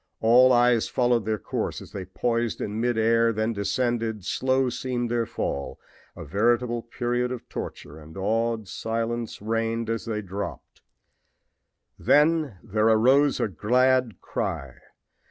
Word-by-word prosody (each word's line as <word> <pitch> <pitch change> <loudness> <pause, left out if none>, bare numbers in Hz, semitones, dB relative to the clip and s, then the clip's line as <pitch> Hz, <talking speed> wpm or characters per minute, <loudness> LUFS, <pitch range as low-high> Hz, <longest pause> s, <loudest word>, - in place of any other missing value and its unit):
All 125 +3 +6
eyes 120 -2 +4
followed 120 -3 +1
their 110 0 0
course - - -3
as - - -12
they 95 -2 -6
poised 115 +4 -1
in 105 +2 -3
mid 120 -1 0
air, 115 +1 +3
then 110 +1 -1
descended. 110 0 -1
Slow 130 +3 +1
seemed 120 -1 -3
their 120 -2 0
fall, 70 -8 -4 0.4
a - - -8
veritable 120 - +1
period 120 +1 -2
of 125 - -6
torture, 75 +2 -7
and 80 +2 -13
awed 110 +2 -1
silence 115 +2 -3
reigned 115 +1 -1
as 115 - -3
they 110 -2 -3
dropped. 100 +1 -7 1.2
Then 150 - +3
there 110 +2 +1
arose 130 +6 +4
a - - +1
glad 125 +5 +2
cry. - - -4
115 Hz, 135 wpm, -25 LUFS, 110-120 Hz, 1.2 s, All